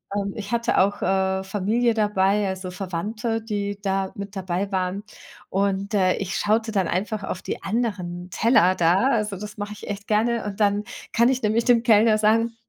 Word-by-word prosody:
Ähm, 200 -1 -2
ich 210 -1 -6
hatte 235 0 +1
auch, 200 +2 +2
äh, 190 0 +1
Familie 215 +5 +1
dabei, 205 -1 +2
also, 190 -1 -5
Verwandte, 210 +6 -3
die 205 -2 -3
da 195 -1 -1
mit 200 0 -7
dabei 190 +1 -2
waren. 190 +1 -2 0.5
Und, 195 +1 -1
äh, 185 -2 +3
ich 195 -1 -3
schaute 220 +2 +1
dann 195 -5 +1
einfach 210 +3 -2
auf 185 -1 -4
die - - -5
anderen 190 -5 -3
Teller 185 -2 +3
da. 180 +8 +3
Also, 215 -5 0
das 210 +1 -8
mache 205 0 -5
ich 210 - -11
echt 205 -1 -6
gerne 225 +2 +1
und 205 0 -5
dann 205 0 +2 0.3
kann 235 +1 +4
ich 260 -1 0
nämlich 220 +2 +1
dem 240 -2 +5
Kellner 220 -1 +5
sagen, 225 +2 +2
205 Hz, 185 wpm, -23 LUFS, 190-220 Hz, 0.5 s, dem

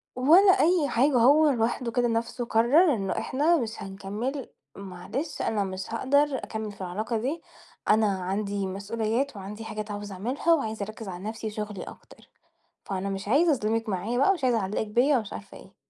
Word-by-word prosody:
ولا 335 +10 +6
أي 330 -3 +3
حاجة، 270 +6 +3
هو 290 +6 +6
لوحده 240 -1 0
كده 245 +1 +1
نفسه 235 +1 -2
قرر 270 +10 +4
إنه 195 -5 -2
إحنا 310 +6 +2
مش 230 -5 -4
هنكمل، 205 +8 -5 0.3
"معلش 195 - -5
أنا 210 -2 0
مش 190 +2 -6
هاقدر 280 +4 +2
أكمل 220 -3 -5
في 200 - -13
العلاقة 210 +6 -2
دي، 275 +9 -3 0.5
أنا 215 0 +4
عندي 200 +1 -2
مسؤوليات 220 +7 -2
وعندي 205 +3 -8
حاجات 215 -1 -5
عاوز 205 0 -6
أعملها 250 - 0
وعايز 220 -9 -1
أركِّز 215 +1 -6
على 180 -1 -7
نفسي، 220 +1 -4
شغلي 210 -2 -5
أكتر. - - -14 0.6
فأنا 195 0 -3
مش 195 +1 -5
عايزة 310 +8 +4
أظلمِك 225 -2 -1
معايا 210 +5 -2
بقى، 280 +9 +5
مش 340 -8 -4
عايز 250 -2 +3
أعلقِك 210 0 -1
بيَّ، 250 +7 +3
ومش 215 -4 -3
عارفة 100 0 -9
إيه." - - -15
225 Hz, 175 wpm, -27 LUFS, 200-265 Hz, 0.6 s, ولا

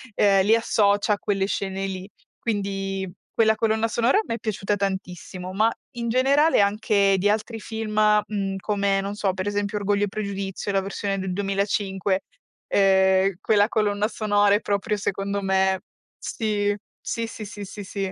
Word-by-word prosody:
ehm, 195 -2 +4
li 220 +3 +5
associa 205 -2 +2
a 205 - -3
quelle 195 -1 0
scene 195 -1 -2
lì. 190 +1 -5 0.3
Quindi, 195 -3 -2 0.3
quella 220 -1 +5
colonna 220 0 +1
sonora 235 - +2
mi - - -2
è 230 - -4
piaciuta 205 -2 -1
tantissimo, 185 -1 -4
ma 220 +3 +3 0.3
in 235 -1 -2
generale 275 +5 +4
anche 200 -1 +3
di 205 +2 +2
altri 220 +2 -1
film, 220 -1 -5 0.3
mhmm, 195 -2 -2
come, 200 0 0
non 200 +1 -3
so, 200 -2 0
per 190 0 -4
esempio 205 0 -1
Orgoglio 205 0 +1
e - - -5
Pregiudizio, 200 -1 -4
la 195 0 +2
versione 195 0 -3
del 190 -1 -3
2005, 195 -1 -1 0.4
ehm, 190 -1 +3
quella 205 -1 +3
colonna 210 -2 +1
sonora 205 -2 +2
è - - +2
proprio 205 0 -1
secondo 200 0 -2
me 190 0 +2 0.4
sì, 205 -2 -1 0.2
sì, 230 -1 -3
sì, 215 -1 -8
sì, 205 0 -8
sì, 205 +1 -8
sì. 195 -1 -4
200 Hz, 160 wpm, -24 LUFS, 195-215 Hz, 0.4 s, li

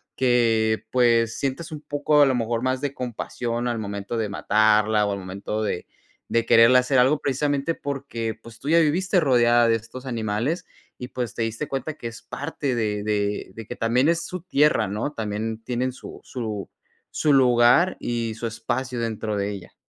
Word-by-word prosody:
que, 115 -3 +2
pues, 115 -2 +3
sientes 150 +5 -3
un 150 - -7
poco 145 0 +2
a - - +8
lo 130 - +2
mejor 115 0 -1
más 130 0 0
de 140 -1 -3
compasión 120 -1 -3
al 120 -2 -1
momento 100 +1 -4
de 110 -2 -1
matarla, 105 +1 +3
o 100 - -1
al 100 - -3
momento 100 +3 -4
de 95 -4 -2 0.4
de 115 0 +1
quererle 115 +3 +7
hacer 125 +1 +1
algo, 135 +4 +4
precisamente 145 +3 0
porque, 135 -5 -4
pues, 115 -1 -13
tú 145 - -5
ya 170 +1 +6
viviste 180 +4 +2
rodeada 120 -5 +4
de 115 - +4
estos 115 +4 -8
animales 115 +7 -2 0.3
y, 125 - -7
pues, 120 -4 -4
te 115 - -1
diste 115 +6 -3
cuenta 140 +3 -3
que 120 - -6
es 115 - -9
parte 145 -2 -4
de 105 -3 -1
de 105 -2 -1
de 115 0 -8
que 120 - -6
también 125 +6 +2
es 170 0 0
su 180 -2 -6
tierra, 150 - +2
¿no? 105 +9 -3
También 110 -1 -3
tienen 125 +2 -1
su 130 - -11
su 110 -5 -5 0.4
su 150 -2 +2
lugar 125 +6 +5
y 115 -2 -2
su 115 +1 -4
espacio 125 +2 -3
dentro 110 -2 -2
de 100 +1 -1
ella. 100 -3 -9
120 Hz, 185 wpm, -24 LUFS, 110-135 Hz, 0.4 s, a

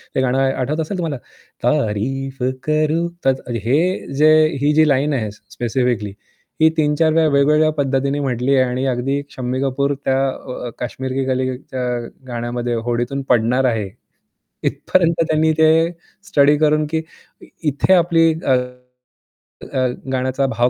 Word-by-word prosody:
हे - - +2
गाणं 130 0 +1
आठवत 135 +3 0
असेल 160 +5 -3
तुम्हाला? 160 -5 -2 0.5
तारीफ 135 +6 -1 0.3
करूँ. 155 +3 +1 0.2
त - - +2 0.4
हे 130 +5 +3 0.4
जे 155 - +7 0.3
ही 145 +1 +3
जी 155 +1 +4
लाईन 145 +1 +2
आहे 110 -6 -1
स्पेसिफिकली 115 -1 -2 0.5
ही 160 - +7
3-4 155 +1 +2
वेळा 160 0 +3
वेगवेगळ्या 150 +2 +4
पद्धतीने 140 0 0
म्हटली 130 0 0
आहे 130 -1 +3
आणि 130 +2 -2
अगदी 135 +3 -1
शम्मी 130 0 -3
कपूर 140 +1 0
त्या 130 - +2 0.5
अ, - - -4
काश्मीर 130 +2 -4
की 135 0 -1
कलीच्या 130 0 -3 0.5
गाण्यामध्ये 120 0 -3
होडीतून 120 +3 -1
पडणार 125 +2 +2
आहे. 110 -5 0 0.7
इथपर्यंत 170 -2 +1
त्यांनी 155 0 +2
ते 160 0 +6 0.6
स्टडी 145 +1 +4
करून 155 0 +2
की 160 0 -1 0.7
इथे 145 +7 +1
आपली, 165 -2 +4
अ, 130 - +3 1.1
अ, 130 -1 -1 0.2
गाण्याचा 130 +1 0
भाव 120 +2 +3
135 Hz, 135 wpm, -19 LUFS, 125-150 Hz, 1.1 s, जे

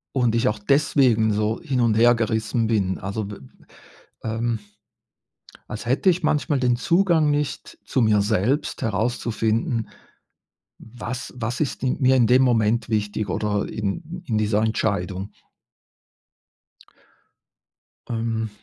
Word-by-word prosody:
d 130 - +1
und 115 -2 +2
ich 115 +2 +2
auch 105 - 0
deswegen 125 -3 +3
so 105 +2 -1
hin 130 -2 -2
und 115 -3 +3
hergerissen 115 -1 +2
bin. 100 -4 0
Also, 100 +3 -4
de 100 0 -8
m 65 - -18 0.6
ähm, 115 +1 -1 1.1
als 110 +2 -7
hätte 130 +10 +2
ich 180 0 +3
manchmal 145 -2 +1
den 125 -1 +2
Zugang 165 +1 +2
nicht 145 -1 -3
zu 130 - 0
mir 105 -2 +4
selbst 110 - 0
herauszufinden, 115 0 -1 0.9
was 120 +2 -7
was 120 +3 -3
ist 145 - -2
mir 130 0 +2
in 120 - +4
dem 125 +2 +5
Moment 115 -3 +2
wichtig 105 -1 -1
oder 105 -1 -1
in 155 - -5
in 110 -6 0
dieser 105 0 +1
Entscheidung? 100 -3 -1 2.8
Ähm 115 -1 -2
115 Hz, 125 wpm, -23 LUFS, 110-130 Hz, 2.8 s, dem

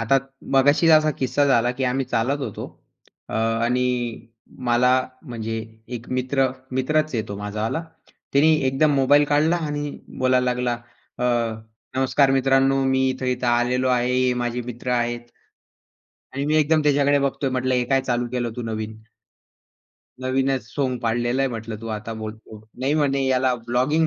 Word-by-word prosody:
आता 115 +4 +3 0.4
मगाशीच 145 +5 +5
असा 155 0 +3
किस्सा 135 +2 +2
झाला, 120 -1 +3
की 130 - 0
आम्ही 130 +2 0
चालत 130 +6 +1
होतो - - -6 0.6
अ, - - -4
आणि 115 +3 +1 0.8
मला 120 +1 +4 0.4
म्हणजे 115 -1 -4 0.4
एक 120 +1 -12
मित्र, 135 +1 +1 0.3
मित्रच 155 +3 0
आहे 110 - 0
तो 100 - -5
माझावाला, 105 +9 -3 0.5
त्याने 150 +3 +5 0.2
एकदम 145 +3 +2
मोबाईल 145 +2 +5
काढला 155 +4 +3
आणि 145 -1 -3 0.3
बोलायला 130 0 +3
लागला, 125 -1 0 0.5
अ, 125 - -1 0.7
"नमस्कार 135 +1 +3
मित्रांनो 135 0 +3
मी 130 0 +2
इथे-इथे 125 -1 -2
आलेलो 125 +2 +2
आहे, 125 0 +1
हे 130 0 +2
माझे 120 0 -2
मित्र 125 +1 -5
आहेत" 120 0 -1 1.1
आणि 140 - -2
मी 155 +1 +2
एकदम 155 +1 +3
त्याच्याकडे 145 -1 +3
बघतोय, 140 0 -1
म्हटलं, 130 0 0
"हे 125 -1 +1
काय 135 - +4
चालू 120 -2 -1
केलं 120 -2 -1
तू 120 - -4
नवीन!?" 110 -1 -4 1.2
"नवीनच 130 0 0
सोंग 130 0 -2
पाडलेला 120 +3 0
आहे" 135 - +1
म्हटलं 115 -2 -6
तू 115 - -7
आता 110 +2 -7
बोलतो. 110 0 -8 0.2
नाही 135 +3 +1
म्हणे, 140 -3 +1
"याला 130 -1 +2
ब्लॉगिंग 130 +7 +2
130 Hz, 150 wpm, -23 LUFS, 120-135 Hz, 1.2 s, मगाशीच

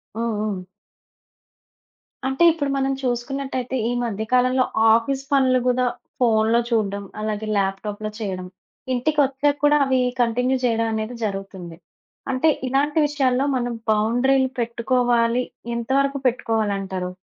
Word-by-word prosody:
హ్మ్. 230 0 -1
హ్మ్. 200 -4 -3 1.6
అంటే 265 +5 +1
ఇప్పుడు 295 -3 -2
మనం 270 0 0
చూసుకున్నట్టైతే 255 +1 -2
ఈ - - 0
మధ్య 220 -2 -3
కాలంలో 255 +1 +3 0.3
ఆఫీస్ 265 +4 0
పనులు 260 -2 +4
గూడా 250 0 +2 0.4
ఫోన్‌లో 225 -1 +3
చూడ్డం 205 -3 0 0.2
అలాగే 215 0 -3
ల్యాప్‌టాప్‌లో 205 +2 -2
చేయడం 185 -4 -4 0.5
ఇంటికొచ్చాక 285 +1 +1
కూడా 295 0 +5
అవి 260 -1 +2 0.2
కంటిన్యూ 250 +3 +1
చేయడమనేది 225 0 -1
జరుగుతుంది. 195 -4 -6 0.5
అంటే 275 +5 +2 0.2
ఇలాంటి 290 +4 +1
విషయాల్లో 270 -2 +1
మనం 245 -1 -1 0.2
బౌండరీలు 245 +5 +2
పెట్టుకోవాలి. 240 0 +1 0.3
ఎంతవరకు 275 +4 0
పెట్టుకోవాలంటారు? 200 -6 -1
240 Hz, 110 wpm, -22 LUFS, 220-265 Hz, 1.6 s, కూడా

